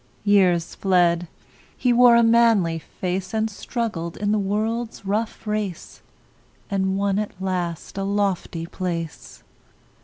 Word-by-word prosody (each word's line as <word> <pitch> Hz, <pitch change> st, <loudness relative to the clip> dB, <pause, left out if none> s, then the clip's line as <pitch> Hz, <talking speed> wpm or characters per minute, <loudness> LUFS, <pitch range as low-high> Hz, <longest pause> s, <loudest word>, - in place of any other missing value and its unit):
Years 185 Hz, -5 st, +3 dB
fled; 175 Hz, -2 st, +2 dB, 0.5 s
he 250 Hz, -2 st, +2 dB
wore 245 Hz, 0 st, +7 dB
a 235 Hz, -, +5 dB
manly 225 Hz, -8 st, +4 dB
face, 185 Hz, +5 st, -4 dB
And 220 Hz, 0 st, 0 dB
struggled 200 Hz, -6 st, -4 dB
in 205 Hz, 0 st, 0 dB
the 215 Hz, -, +2 dB
world's 220 Hz, +3 st, -2 dB
rough 215 Hz, +3 st, -2 dB
race, 210 Hz, -5 st, -4 dB, 0.7 s
And 190 Hz, -1 st, 0 dB
won 200 Hz, 0 st, +1 dB
at 210 Hz, -3 st, -5 dB
last 180 Hz, -1 st, -3 dB
a -, -, -1 dB
lofty 195 Hz, -4 st, -1 dB
place. 170 Hz, -2 st, -5 dB
195 Hz, 125 wpm, -23 LUFS, 180-215 Hz, 0.7 s, wore